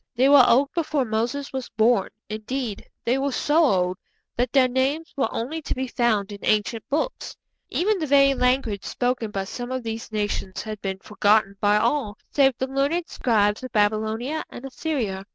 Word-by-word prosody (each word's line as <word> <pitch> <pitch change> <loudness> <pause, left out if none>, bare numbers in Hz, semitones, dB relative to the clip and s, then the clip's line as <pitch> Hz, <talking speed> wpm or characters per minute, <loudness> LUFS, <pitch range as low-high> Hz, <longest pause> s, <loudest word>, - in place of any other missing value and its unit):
They 255 +3 +4
were 285 -2 +8
old 275 +4 +4
before 305 -5 0
Moses 235 +6 -2
was 265 -2 -4
born; 225 -1 +2 0.2
indeed, 215 +1 -4 0.2
they 250 +3 +2
were 280 +1 0
so 300 +5 +2
old 185 - +2 0.4
that 245 0 0
their 265 -2 +5
names 270 +6 -1
were 270 -5 0
only 300 +8 -3
to - - -3
be 260 0 -2
found 235 -5 0
in 200 - -8
ancient 215 +1 0
books; 315 - -2 0.3
even 410 +2 +1
the 310 - -2
very 275 0 +5
language 250 -5 0
spoken 245 -3 -1
by 195 -2 -3
some 245 +5 -6
of 260 -1 -3
these 225 0 -5
nations 205 -3 -3
had 215 -2 -7
been 190 -1 -3
forgotten 210 0 +2
by 205 0 +4
all 215 -2 0
save 270 -3 +3
the 260 - -1
learned 280 +6 -1
scribes 210 -3 +1
of 255 -1 -7
Babylonia 220 +7 0
and 250 - -9
Assyria. 250 -8 -3
245 Hz, 180 wpm, -24 LUFS, 215-275 Hz, 0.4 s, were